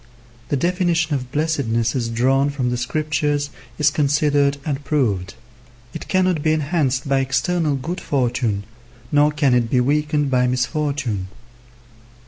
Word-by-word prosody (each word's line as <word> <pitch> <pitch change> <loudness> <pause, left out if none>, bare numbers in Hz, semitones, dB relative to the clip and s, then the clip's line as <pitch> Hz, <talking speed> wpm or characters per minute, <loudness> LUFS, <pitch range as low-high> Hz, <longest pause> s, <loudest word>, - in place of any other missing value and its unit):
The 145 - +1
definition 175 0 +1
of 125 -3 -3
blessedness 135 -7 0
as 120 -3 -1
drawn 135 +4 +2
from 130 -4 -2
the 125 - -1
Scriptures 145 +2 -1 0.3
is 150 0 +3
considered 145 -1 +2
and 145 -2 -3
proved. 105 -11 -1 0.6
It - - -7
cannot 185 -4 +1
be 155 +1 +2
enhanced 145 -3 0
by 135 0 +2
external 140 +4 0
good 170 +7 -4
fortune, 120 -6 0 0.5
nor 150 0 +4
can 145 -3 +2
it 120 -2 +2
be 125 - +2
weakened 145 +2 +1
by 125 -1 +3
misfortune. 130 - -1
140 Hz, 135 wpm, -21 LUFS, 125-150 Hz, 0.6 s, nor